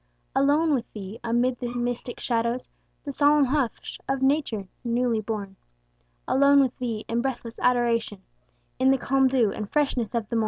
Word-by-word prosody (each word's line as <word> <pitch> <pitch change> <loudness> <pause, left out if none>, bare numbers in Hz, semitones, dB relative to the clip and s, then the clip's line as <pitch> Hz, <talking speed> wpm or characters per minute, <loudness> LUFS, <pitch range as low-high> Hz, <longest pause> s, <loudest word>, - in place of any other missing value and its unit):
Alone 290 +3 +3
with 245 -4 -2
Thee, 205 0 -8
amid 240 +2 +1
the 240 -1 -4
mystic 245 0 -3
shadows, 235 +1 -1 0.4
The 285 - -4
solemn 290 +1 +4
hush 265 -3 -2
of 270 0 0
nature 265 -8 +1 0.2
newly 240 -2 0
born; 205 -3 -5 0.7
Alone 280 +1 +5
with 260 -2 +2
Thee 230 -4 -3
in 230 +1 0
breathless 240 -3 -4
adoration, 235 -5 +1 0.6
In 260 +1 +4
the 270 - +4
calm 270 +1 +2
dew 250 -5 +2
and 210 -2 -5
freshness 260 -6 0
of 225 -3 -1
the 230 - -1
morn. - - +3
245 Hz, 165 wpm, -25 LUFS, 230-270 Hz, 0.7 s, Alone